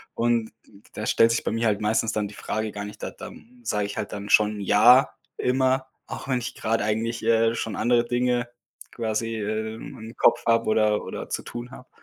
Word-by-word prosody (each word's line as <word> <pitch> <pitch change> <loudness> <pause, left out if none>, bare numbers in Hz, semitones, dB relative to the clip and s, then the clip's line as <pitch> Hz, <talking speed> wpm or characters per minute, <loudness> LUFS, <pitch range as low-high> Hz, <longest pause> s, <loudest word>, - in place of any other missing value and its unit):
Und 115 -1 +1
d 100 -1 -19
da 105 - -5
stellt 115 - +4
sich 115 - 0
bei - - -1
mir 115 +1 0
halt 105 -2 +1
meistens 110 +1 +1
dann 105 -1 -1
die 100 - -12
Frage 110 +1 -3
gar 100 0 -6
nicht, 105 - -10
da - - -3
da - - -9 0.3
sage 105 -3 -1
ich 100 - -6
halt - - -4
dann 100 0 -6
schon 105 0 +4
„ja“, 120 +7 +6 0.3
immer, 130 +1 +1 0.2
auch - - -7
wenn 130 -2 +1
ich 120 - -6
gerade 115 0 0
eigentlich, 115 +2 -1
äh, 115 0 +3
schon 110 -2 -3
andere 120 +1 +2
Dinge 120 0 0 0.4
quasi, 115 0 -2
äh, 110 +1 -3
im 115 - -10
im 110 +1 -10
Kopf - - +4
habe 115 0 +3
oder 110 -1 +2
oder - - -6
zu - - -3
tun 120 +1 -7
habe. 130 0 -13
115 Hz, 215 wpm, -25 LUFS, 105-120 Hz, 0.4 s, ja